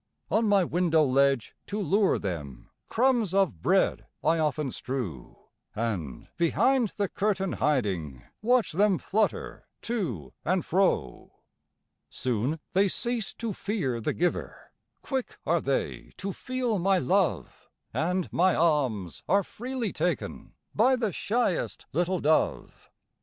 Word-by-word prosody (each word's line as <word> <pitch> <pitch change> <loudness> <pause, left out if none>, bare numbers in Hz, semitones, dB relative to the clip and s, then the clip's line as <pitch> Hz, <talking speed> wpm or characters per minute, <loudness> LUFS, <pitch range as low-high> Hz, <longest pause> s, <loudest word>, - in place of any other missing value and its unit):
On 220 0 +3
my 200 -2 +5
window 170 -2 +2
ledge, 135 -2 +2
to 205 - -3
lure 200 +2 +3
them, 70 -10 -6 0.2
Crumbs 235 -6 +2
of 175 - +2
bread - - +2 0.2
I 160 +1 +3
often 150 -3 0
strew, 115 - -5 0.4
And, 100 - -3
behind 240 +9 +3
the 200 -1 +1
curtain 195 -2 0
hiding, 95 - -1 0.2
Watch 245 +1 +3
them 195 +2 +3
flutter 215 +2 -1 0.2
to 160 - -3
and 180 0 0
fro. 165 - 0 0.7
Soon 125 +6 -1
they 195 +2 +4
cease 235 +2 -2
to 230 -3 -3
fear 145 - -2
the - - -1
giver, 175 +1 -2 0.3
Quick 265 -3 -3
are - - +2
they - - -2
to 195 0 -4
feel 250 -3 -2
my 190 +2 +3
love, 185 0 0 0.2
And 180 +2 0
my 185 +1 +4
alms 130 - +1
are 200 +2 +4
freely 245 +2 -4
taken - - -2 0.2
By 260 +1 +4
the 225 -7 -1
shyest 225 -3 -1
little 175 +2 +1
dove. 155 +1 0
180 Hz, 125 wpm, -28 LUFS, 135-210 Hz, 0.7 s, my